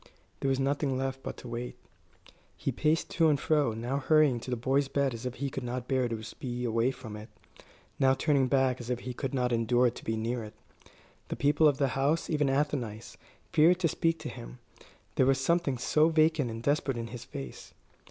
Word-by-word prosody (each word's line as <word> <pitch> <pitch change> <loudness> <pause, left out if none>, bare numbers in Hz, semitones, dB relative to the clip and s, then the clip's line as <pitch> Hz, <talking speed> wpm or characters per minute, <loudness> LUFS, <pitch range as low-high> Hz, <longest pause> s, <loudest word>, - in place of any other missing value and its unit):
There 135 - 0
was 135 0 +1
nothing 140 0 0
left 135 0 -3
but - - -6
to - - -10
wait. 120 +1 -5 0.8
He - - -2
paced 155 +1 0
to 165 -2 +3
and 145 -2 +2
fro, 145 -7 +2
now 120 +5 -2
hurrying 145 -3 +4
to 120 - -8
the 125 - -1
boy's 135 +4 +1
bed 140 -1 0
as 115 +2 -5
if 125 - -5
he 140 +2 -3
could 135 - -4
not 125 0 -4
bear 130 -2 +1
to 110 -1 -4 0.2
be 125 -1 -4
away 115 +1 +2
from 120 -5 -7
it, 105 +1 -9 0.7
now 135 0 +4
turning 140 -1 +2
back 130 -1 +2
as 120 - -8
if 125 -1 -2
he 125 - -5
could 135 +2 -4
not 125 -1 +1
endure 120 +1 +3
to - - -11
be 110 0 -2
near 115 +2 -2
it. 105 - -10 0.7
The - - -3
people 150 +2 +4
of 145 -2 +2
the 140 -2 +1
house, 140 +8 0
even 150 -3 +2
Athenais, 135 -6 -2 0.4
feared 165 +4 +5
to 165 - +4
speak 165 +1 0
to - - -5
him, - - -9 0.6
there 130 - +4
was 135 -1 +3
something 160 -2 +1
so 155 +6 +3
vacant 155 -4 +3
and 115 0 -6
desperate 140 -2 +1
in 115 0 -4
his 120 -1 -7
face. 70 - -9
130 Hz, 210 wpm, -29 LUFS, 120-145 Hz, 0.8 s, feared